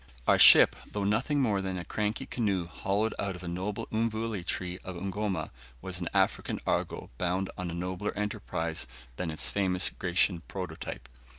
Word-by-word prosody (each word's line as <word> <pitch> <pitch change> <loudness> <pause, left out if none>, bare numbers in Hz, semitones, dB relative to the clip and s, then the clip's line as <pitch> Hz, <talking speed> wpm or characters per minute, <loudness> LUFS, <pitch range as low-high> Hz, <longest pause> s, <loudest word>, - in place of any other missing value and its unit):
Our - - +5
ship - - +9 0.2
though 105 - -2
nothing 115 +9 +1
more 105 -6 +2
than 95 -1 -3
a 90 - -5
cranky 105 0 -2
canoe 100 -7 0
hollowed 100 +6 -1
out 100 -2 -1
of 90 - -10
a - - -6
noble 95 +4 -3
mvule 110 -3 -1
tree 90 +1 -3
of 95 - -7
Ugoma 100 +2 -2 0.3
was 90 +5 -5
an 85 - -2
African - - +1
Argo - - -1
bound 90 +2 0
on 90 -2 -4
a 85 - -4
nobler 90 +3 -2
enterprise 105 -10 -2 0.3
than 90 - -2
its 80 - -2
famous 95 -2 +2
Grecian 90 -1 +1
prototype. 80 -9 -6
95 Hz, 170 wpm, -30 LUFS, 90-105 Hz, 0.3 s, ship